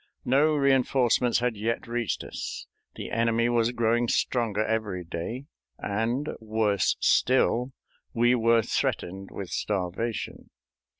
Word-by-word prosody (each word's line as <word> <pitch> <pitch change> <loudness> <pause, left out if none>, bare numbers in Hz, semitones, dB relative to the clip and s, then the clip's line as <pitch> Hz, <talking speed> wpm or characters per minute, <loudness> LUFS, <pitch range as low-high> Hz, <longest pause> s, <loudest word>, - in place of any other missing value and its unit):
No 150 +4 +3
re 140 -2 +4
enforcements 125 -2 +2
had 125 -2 0
yet 110 +3 -2
reached 120 -3 -2
us, - - -6 0.3
the - - -7
enemy 115 0 +1
was 120 -1 +2
growing 120 0 +1
stronger 110 -3 0
every 105 -5 -2
day, 85 +11 -5 0.3
and, 115 +8 -2
worse 110 -3 0
still, 125 0 +2 0.4
we 120 +1 +3
were 115 -1 +3
threatened 95 0 -2
with 95 -3 -6
starvation. 100 +3 -3
115 Hz, 120 wpm, -27 LUFS, 105-120 Hz, 0.4 s, re